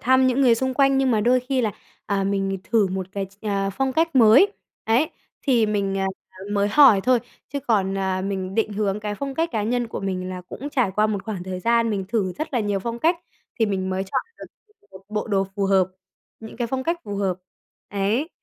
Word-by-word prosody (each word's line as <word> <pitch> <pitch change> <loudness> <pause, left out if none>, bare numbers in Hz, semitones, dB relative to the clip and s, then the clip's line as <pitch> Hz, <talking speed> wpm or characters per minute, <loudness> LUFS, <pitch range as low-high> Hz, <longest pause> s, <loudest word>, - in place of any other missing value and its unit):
thăm 260 +1 +4
những 255 +2 +2
người 245 -3 +6
xung 260 +2 -1
quanh 275 0 +4
nhưng 265 -1 +2
mà 215 -2 +2
đôi 250 +3 +3
khi 260 +1 -1
là, 215 -4 0 0.3
à, 195 -1 0
mình 195 0 -1
thử 220 -4 +2
một 185 0 -3
cái 195 -1 -3
ch 195 +3 -23
à, 195 -1 0
phong 265 +6 -1
cách 325 +1 +1
mới 255 - +7 0.3
ấy, 245 +9 +2 0.3
thì 240 -5 +3
mình, 200 -2 -1
à, 195 - 0 0.5
mới 205 0 +2
hỏi 255 -5 +7
thôi, 250 +4 +3 0.3
chứ 280 +1 -4
còn, 195 -7 +1
à, 190 -1 -1
mình 190 -1 -3
định 220 -1 0
hướng 205 0 -1
cái 210 0 -3
phong 275 +5 -5
cách 330 +4 0
cá 215 - 0
nhân 240 +3 0
của - - -5
mình 185 -2 -3
là 185 0 -5
cũng 215 +10 -8
trải 250 -8 +1
qua 215 0 +4
một 205 -3 -2
khoảng 210 -5 -4
thời 185 0 -5
gian 230 +2 +2
mình 200 -2 -2
thử 200 -5 0
rất 310 - -5
là 245 - +1
nhiều 205 -2 0
phong 235 +3 -4
cách 330 +7 +2 0.4
thì 225 - +3
mình 190 -2 -2
mới 190 +1 -1
chọn 250 +7 -1 0.2
được - - -8 0.5
một 190 0 -14
bộ 210 0 -2
đồ 195 -2 +2
phù 200 - 0
hợp, 190 -2 +3 0.5
những 220 0 -10
cái 240 -1 -1
phong 260 +2 -2
cách 335 +4 -1
phù 200 -1 -5
hợp 195 -2 0 0.6
đấy, 210 +9 0
215 Hz, 235 wpm, -23 LUFS, 195-255 Hz, 0.6 s, mới